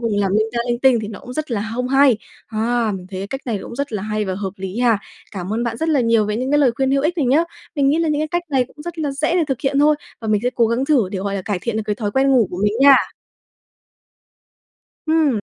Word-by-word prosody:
cùng 205 0 +1
làm 195 -1 0
linh 215 +1 +2
ta 235 - -2
linh 240 - 0
tinh 255 -2 +4
thì 210 - -5
nó 215 - -8
cũng 250 - -9
rất 310 +1 -4
là 220 -1 -2
không 250 +1 -2
hay. 270 -2 +5 0.3
À, 225 0 0
mình 180 -1 -10
thấy 190 0 -5
cái 195 - -4
cách 270 +6 -5
này 220 -4 -1
cũng - - -8
rất 280 -2 -3
là 205 - -3
hay 215 0 -2
và 190 -1 -3
hợp 195 -1 -4
lý 190 +3 -5
ha, 235 -4 +3 0.3
cảm 185 0 -5
ơn 230 +2 -1
bạn 230 -1 -2
rất 320 +6 -2
là 300 -4 +3
nhiều 230 -2 +3
về 210 +1 -1
những 255 +2 -2
cái 295 - +3
lời 270 -4 +4
khuyên 265 +1 +1
hữu 275 0 +2
ích 340 +3 0
này 280 - +1
nhé! 295 +7 +3 0.3
Mình 280 -2 +2
nghĩ 300 +4 +2
là 330 -1 +1
những 300 0 0
cái 310 - -1
cách 345 +3 -1
này 265 -3 +2
cũng 295 - -14
rất 345 0 -7
là 295 -3 -1
dễ 300 +4 -1
để 345 -3 +3
thực 265 -3 -2
hiện 275 0 0
thôi, 300 +1 +4 0.2
và 220 - -5
mình 210 -1 +2
sẽ 250 - +2
cố 235 - +3
gắng 235 +4 0
thử 260 -10 +2
để, 190 - -2
gọi 200 +1 -3
là, 190 - -3
cải 200 -3 -2
thiện 235 -2 -2
được 220 - -1
cái 210 - 0
thói 205 -1 -3
quen 270 +2 +2
ngủ 245 -6 +4
của 180 - -5
mình 210 - +2
nha. 275 -1 +8 2.1
Ừm. 310 -7 +3
240 Hz, 300 wpm, -20 LUFS, 210-280 Hz, 2.1 s, nha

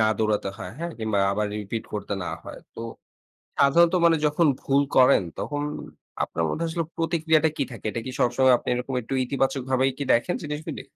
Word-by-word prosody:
না - - +5
দৌড়াতে 105 -2 0
হয়, 90 - -6
হ্যাঁ? 170 +1 -3
কিংবা 110 -2 -1
আবার 105 +1 0
রিপিট 110 +2 -4
করতে 105 -1 -4
না - - -5 0.2
হয়। - - -8 0.2
তো - - -8 0.8
সাধারণত 165 +5 +5
মানে 165 -1 +5
যখন 150 +2 +2
ভুল 140 +1 +2
করেন 130 -4 +6 0.2
তখন 145 0 -3 0.6
আপনার 85 - -2
মধ্যে 165 - -2
আসলে 165 0 -2
প্রতিক্রিয়াটা 160 -1 +2
কী - - 0
থাকে? 115 - -8
এটা 115 - -4
কি 130 - -3
সবসময় 125 +1 +4
আপনি - - -9
এরকম 125 +2 -3
একটু 125 +4 -5
ইতিবাচকভাবে 130 0 0
কি 140 - -2
দেখেন 120 +10 +2
জিনিসগুলি? 150 +1 -5
135 Hz, 180 wpm, -25 LUFS, 115-155 Hz, 0.8 s, করেন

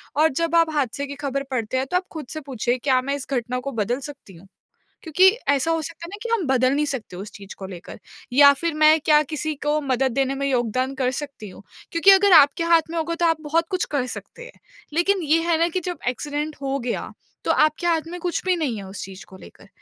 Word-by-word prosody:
और 310 +2 +4
जब 335 +4 -1
आप 330 -1 +4
हादसे 280 -1 -1
की 280 - -7
ख़बर 275 -1 -3
पढ़ते 250 -1 -2
हैं 260 - 0
तो 360 - +3
आप 365 - -2
खुद 315 -4 -7
से 315 - -5
पूछिए 250 -3 -2
क्या 255 0 +1
मैं 275 +2 -2
इस 280 - -7
घटना 250 -1 -1
को 275 +2 -5
बदल 235 +1 -1
सकती 275 -7 -11
हूँ? 175 +4 -16 0.6
क्योंकि 365 +3 +4 0.2
ऐसा 285 +3 +2
हो 325 -1 0
सकता 325 +2 -8
है - - -9
ना 405 - -8
कि 470 - -4
हम 420 -7 0
बदल 260 0 +2
नहीं 300 +1 +1
सकते 255 -10 -5
उस 200 +3 -8
चीज़ 200 -1 -11
को 195 - -7
लेकर 180 +1 -10 0.3
या 280 +2 +8
फिर 330 +4 -3
मैं 310 +1 +5
क्या 300 0 +4
किसी 310 0 -3
को 300 +1 +2
मदद 265 -1 0
देने 270 +1 0
में 275 0 -2
योगदान 255 +1 -1
कर 255 -1 0
सकती 275 -8 -9
हूँ? 190 - -14 0.3
क्योंकि 335 +4 +6
अगर 390 0 +6
आपके 285 +3 +3
हाथ 335 -1 +3
में 335 - -4
होगा 335 +1 -1
तो 340 - 0
आप 325 -2 +1
बहुत 325 +2 0
कुछ 370 -1 -1
कर 260 -3 +1
सकते 485 - -11
हैं। - - -15 0.3
लेकिन 370 +4 +1
ये 320 +2 +2
है 335 -1 +2
ना 335 - +3
कि 370 - -2
जब 355 -1 -5
एक्सीडेंट 295 +4 -3
हो 275 0 -1
गया 240 -2 -4 0.3
तो - - +2
आपके 310 +3 +2
हाथ 330 -2 +2
में 355 - -6
कुछ 350 0 -2
भी 370 -1 +2
नहीं 290 -9 -2
है 200 - -7
उस 190 +1 -8
चीज़ 190 0 -10
को 190 - -14
लेकर। 195 - -16
285 Hz, 250 wpm, -23 LUFS, 255-330 Hz, 0.6 s, या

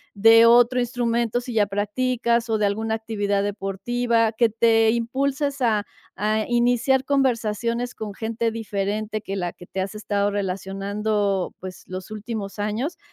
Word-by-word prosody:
de 225 +3 +7
otro 245 +1 +5
instrumento 240 -1 0
si 245 0 -7
ya 210 -2 +3
practicas 235 +3 0
o 220 - +2
de 210 - +1
alguna 220 +2 -1
actividad 205 -3 -1
deportiva 225 +4 0
que 230 +1 +2
te 225 0 +3
impulses 270 +4 -1
a 215 -3 +2 0.3
a 215 +1 0
iniciar 245 +2 +2
conversaciones 240 -3 0
con 210 -2 -7
gente 230 +1 -1
diferente 215 -1 -3
que 195 -2 -5
la 175 -3 -3
que 175 - -14
te 190 - -5
has 190 +2 -4
estado 205 -1 -1
relacionando, 200 +1 -1
pues 185 0 -9
los 185 +2 -7
últimos 215 -2 -6
años, 215 +10 -2
220 Hz, 145 wpm, -23 LUFS, 205-235 Hz, 0.3 s, de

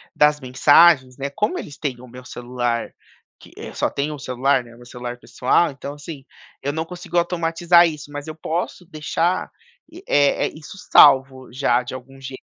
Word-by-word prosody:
das 150 0 +4
mensagens, 130 +1 +4
né, 140 0 -3
como 210 - -1
eles 145 - -9
têm 130 -5 -4
o 125 - -12
meu 125 +1 -12
celular, 120 -1 -3 0.5
que, - - -16
eh, - - -8
só - - 0
tem 145 +2 -2
um 150 - -6
celular, 135 +1 0
né, 120 -1 -16
meu 120 +1 -15
celular 125 0 -7
pessoal, 145 +7 +1
então, 140 +1 -8
assim, 145 -2 -10 0.4
eu 140 +1 -2
não 160 +1 -2
consigo 175 0 -6
automatizar 170 0 +3
isso, 150 -2 -7
mas 145 +1 -7
eu 155 - -7
posso 170 +3 -4
deixar, 170 +2 -1 0.6
eh 145 -1 +2
eh, - - -7
isso 155 +5 -11
salvo 130 -2 +5
já 125 -2 +1
de 125 - -8
algum 130 +1 -10
jeito 130 0 -8
140 Hz, 180 wpm, -21 LUFS, 125-160 Hz, 0.6 s, salvo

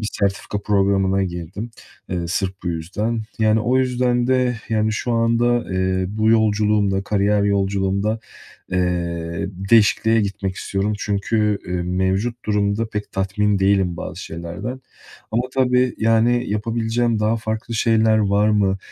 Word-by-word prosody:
bir 105 - -2
sertifika 100 +1 -1
programına 95 -1 +2
girdim, 90 +5 -5 0.4
eee, 90 -2 -2
sırf 95 +1 -1
bu 90 - -3
yüzden. 105 +8 -2 0.2
Yani, 110 0 +3
o 125 +3 +2
yüzden 125 -1 +1
de, 125 -1 +2
yani, 110 -1 +1
şu 120 +2 -2
anda, 115 +1 +2
eee, 95 0 0
bu 110 +2 +1
yolculuğumda, 105 -3 +2
kariyer 105 0 +1
yolculuğumda, 100 +1 0 0.5
eee, 85 -1 -1 0.2
değişikliğe 115 0 +4
gitmek 100 -2 -3
istiyorum. 100 +2 -2
Çünkü, 105 +1 0
eee, 90 - -5
mevcut 95 +6 -1
durumda 105 +1 0
pek 105 -1 -5
tatmin 100 +1 0
değilim 95 -2 +2
bazı - - -6
şeylerden 95 +10 -6 0.5
ama 115 +3 +1
tabii, 125 -1 +2
yani, 115 +2 +2
yapabileceğim 115 +2 0
daha 110 +2 +2
farklı 110 +1 -4
şeyler 110 -1 +3
var 105 0 +2
mı 100 -2 +2
105 Hz, 135 wpm, -21 LUFS, 95-115 Hz, 0.5 s, değişikliğe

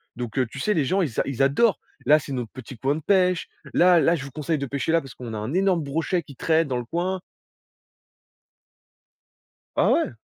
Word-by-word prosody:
donc 120 -1 -6
heu, 130 - +3
tu 135 - -8
sais, 210 +10 +1
les 150 -4 +2
gens, 190 +8 +1
ils 140 -11 -2
a - - +3
ils 135 -1 0
adorent! 165 +11 +3 0.3
«Là, 150 +4 +6
c'est 140 - -7
notre 120 -4 -4
petit 130 -1 -10
coin 135 +6 0
de 160 - -5
pêche. 180 +1 +2 0.3
Là, 180 -1 +6
là, 165 +1 +3
je 140 -4 -5
vous 140 - -9
conseille 155 +3 -2
de 140 - -2
pêcher 140 +3 -2
là 165 - +4
parce 135 -3 -11
qu'on 120 -4 -7
a - - -3
un 110 +8 -4
énorme 185 -2 +2
brochet 165 +5 -1
qui 140 -1 -13
traîne 160 +3 +2
dans 130 -3 -1
le 120 - -4
coin». 180 +6 -2 2.6
Ah - - +4
ouais. 335 - +2
145 Hz, 225 wpm, -24 LUFS, 130-175 Hz, 2.6 s, Là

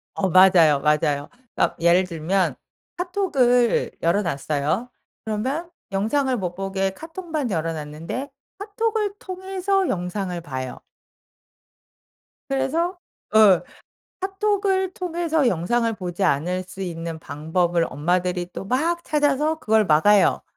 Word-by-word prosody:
어 190 -1 0
맞아요, 175 -5 +6
맞아요. 150 -1 +1 0.3
어 - - +3
예를 170 +2 +4
들면 180 +2 -1 0.4
카톡을 275 - +2
열어 170 +5 +2
놨어요. 155 - -1 0.4
그러면 260 +11 -2 0.2
영상을 255 +7 +1
못 180 -4 -3
보게 195 0 -1
카톡만 320 - -5
열어 165 -3 -1
놨는데 160 - -6 0.3
카톡을 420 0 -1
통해서 380 0 -1
영상을 180 0 -3
봐요. 130 -5 -6 1.7
그래서 315 +7 0 0.4
어 210 -5 +6 0.6
카톡을 385 -1 0
통해서 335 -6 0
영상을 230 +6 +1
보지 180 -1 -5
않을 180 +3 0
수 190 +1 -8
있는 165 -2 -5
방법을 165 +3 0
엄마들이 175 +4 -1
또 - - -6
막 320 - 0
찾아서 300 +1 +1
그걸 220 -5 +2
막아요. 195 +7 +4
200 Hz, 250 characters per minute, -23 LUFS, -, 1.7 s, 맞아요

